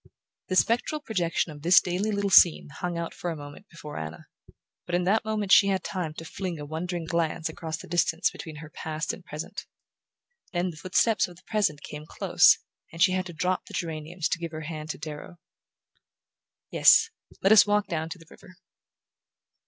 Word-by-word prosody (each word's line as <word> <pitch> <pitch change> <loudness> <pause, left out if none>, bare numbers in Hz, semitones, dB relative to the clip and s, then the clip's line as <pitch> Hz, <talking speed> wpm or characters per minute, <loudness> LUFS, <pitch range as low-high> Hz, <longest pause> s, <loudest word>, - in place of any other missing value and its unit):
The 185 - -2
spectral 240 - +2
projection 180 - -1
of 145 -1 -11
this 175 +4 +6
little 185 +4 -1
daily 200 0 0
scene 170 -5 +6
hung 175 +4 -4
but 170 0 -4
for 175 - -5
a 165 - -3
moment 145 +6 -11
before 150 -3 -8
Anna, 75 -1 -7 0.6
but 175 - -1
in 180 - +1
that 200 +5 +2
moment 215 -2 -2
she 200 - +7
had 190 -2 0
time 165 -5 -4
to 165 - -8
fling 180 -1 -5
a 145 - -6
wondering 165 +3 -4
glance 165 -1 -1
across 160 0 -5
the - - -11
distance 170 -1 +1
between 160 -2 -9
her 155 +1 -10
past 155 0 -4
and - - -10
present. - - -7 0.9
Then 175 +1 0
the 155 - -13
footsteps 190 +5 +2
of 175 - -13
the 175 - -20
present 200 -10 -1
came 150 +1 -8
close, - - +4 0.3
and 165 - -11
she 185 - +5
had 185 0 -1
to 175 - -9
drop 180 +3 -1
the - - -8
geraniums 165 +1 -3
to 170 - -1
give 170 -1 -6
her 155 - -5
hand 155 0 -6
to - - -4
Darrow... 155 +3 -8 1.3
"Yes, 450 +1 +6 0.3
let 195 - +4
us 220 -1 +8
walk 210 0 +2
down 165 -3 -3
to 165 - -7
the 165 - -16
river." 185 +1 -16
170 Hz, 195 wpm, -27 LUFS, 160-185 Hz, 1.3 s, us